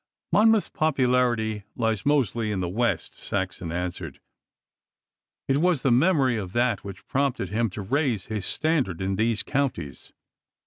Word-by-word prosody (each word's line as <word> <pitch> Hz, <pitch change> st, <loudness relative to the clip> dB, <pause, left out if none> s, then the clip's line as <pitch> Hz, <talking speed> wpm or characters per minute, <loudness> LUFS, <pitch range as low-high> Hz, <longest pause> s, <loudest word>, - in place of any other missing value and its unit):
'Monmouth's 220 Hz, 0 st, +4 dB
popularity 125 Hz, -7 st, +1 dB
lies 115 Hz, -1 st, -1 dB
mostly 120 Hz, -6 st, +1 dB
in 100 Hz, -, -1 dB
the 90 Hz, -, -1 dB
West,' 115 Hz, +7 st, -1 dB
Saxon 95 Hz, -4 st, -4 dB
answered. 85 Hz, -4 st, -4 dB, 1.3 s
'It 135 Hz, -, +2 dB
was 170 Hz, -2 st, +2 dB
the 135 Hz, -, +3 dB
memory 130 Hz, -2 st, +3 dB
of 95 Hz, -3 st, -5 dB
that 120 Hz, -4 st, +1 dB
which 100 Hz, -1 st, -9 dB
prompted 135 Hz, -8 st, -1 dB
him 115 Hz, +3 st, 0 dB
to 100 Hz, +2 st, -6 dB
raise 125 Hz, -2 st, 0 dB
his 105 Hz, -3 st, -4 dB
standard 145 Hz, -, 0 dB
in 95 Hz, 0 st, -1 dB
these 110 Hz, +1 st, 0 dB
counties. 135 Hz, -, -3 dB
115 Hz, 140 wpm, -25 LUFS, 95-135 Hz, 1.3 s, Monmouth's